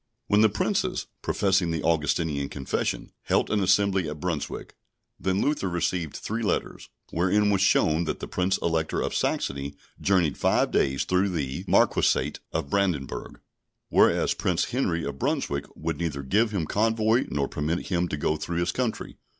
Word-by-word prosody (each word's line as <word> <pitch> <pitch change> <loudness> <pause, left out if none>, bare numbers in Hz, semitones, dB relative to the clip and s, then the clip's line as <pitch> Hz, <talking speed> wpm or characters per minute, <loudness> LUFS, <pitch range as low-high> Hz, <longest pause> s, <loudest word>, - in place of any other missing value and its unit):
When 105 -2 +3
the 110 - +6
Princes 100 - -1 0.2
(professing 95 -3 +1
the 80 -2 -2
Augustinian 80 -3 0
Confession) 65 -2 -3
held - - +1
an 105 - +2
assembly 95 -3 +2
at 75 0 -6
Brunswick, 85 -3 -4 0.5
then 95 +1 0
Luther 145 -10 0
received 85 -2 -1
three 110 +2 -3
letters, 110 - -2 0.2
wherein 105 +5 +2
was 100 -2 +2
shown 80 -3 +3
that - - -3
the - - -5
Prince 95 +1 0
Elector 80 -1 0
of - - -2
Saxony 70 +1 -1 0.3
journeyed 90 -6 +2
five - - +2
days 70 0 +1
through 95 +2 +2
the 70 -7 -3
Marquisate 70 +3 +2
of 70 - -3
Brandenburg, 90 -9 -1 0.5
whereas - - +4
Prince 90 +4 -1
Henry 90 -10 0
of - - -5
Brunswick 125 - -1
would 80 +1 -3
neither 75 -5 -2
give 110 - +2
him 100 -6 -2
convoy 110 +4 +2
nor 70 -1 -1
permit 80 +4 -2
him 90 -2 +1
to 75 - -3
go 75 +2 0
through 85 +3 -4
his 85 0 +1
country. 125 -4 -3
85 Hz, 160 wpm, -26 LUFS, 75-100 Hz, 0.5 s, the